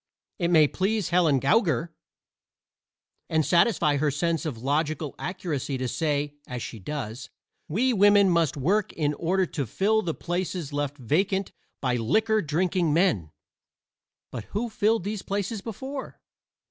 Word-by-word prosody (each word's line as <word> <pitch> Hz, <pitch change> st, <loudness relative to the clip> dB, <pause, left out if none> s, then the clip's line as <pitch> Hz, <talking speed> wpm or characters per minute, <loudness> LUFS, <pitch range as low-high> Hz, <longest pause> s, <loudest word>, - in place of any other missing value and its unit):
It 170 Hz, -, +1 dB
may 160 Hz, -3 st, +5 dB
please 200 Hz, +4 st, -1 dB
Helen 165 Hz, -6 st, +3 dB
Gougar 160 Hz, -, +2 dB, 1.4 s
and 160 Hz, -2 st, +2 dB
satisfy 170 Hz, -5 st, +3 dB
her 150 Hz, +1 st, +1 dB
sense 165 Hz, +3 st, -1 dB
of 135 Hz, -7 st, -4 dB
logical 150 Hz, +1 st, -1 dB
accuracy 155 Hz, -6 st, -3 dB
to 130 Hz, 0 st, -2 dB
say, 145 Hz, +2 st, -1 dB
as 125 Hz, -2 st, -5 dB
she 115 Hz, -, -7 dB
does: 125 Hz, 0 st, -5 dB, 0.4 s
"We 245 Hz, +10 st, +1 dB
women 205 Hz, -1 st, +5 dB
must 165 Hz, -4 st, +1 dB
work 190 Hz, +9 st, +1 dB
in 150 Hz, -2 st, 0 dB
order 185 Hz, +5 st, +1 dB
to 140 Hz, -7 st, -4 dB
fill 215 Hz, -, +2 dB
the 165 Hz, -6 st, -3 dB
places 175 Hz, -3 st, -3 dB
left 145 Hz, 0 st, -2 dB
vacant 190 Hz, -, 0 dB, 0.3 s
by 125 Hz, -2 st, +1 dB
liquor 215 Hz, -, +2 dB
drinking 170 Hz, 0 st, +1 dB
men." 165 Hz, -, +2 dB, 1.0 s
But 115 Hz, -4 st, -6 dB
who 225 Hz, +3 st, -3 dB
filled 220 Hz, -1 st, +1 dB
these 205 Hz, 0 st, -3 dB
places 200 Hz, +2 st, -3 dB
before? 265 Hz, +6 st, -7 dB
165 Hz, 140 wpm, -26 LUFS, 145-195 Hz, 1.4 s, may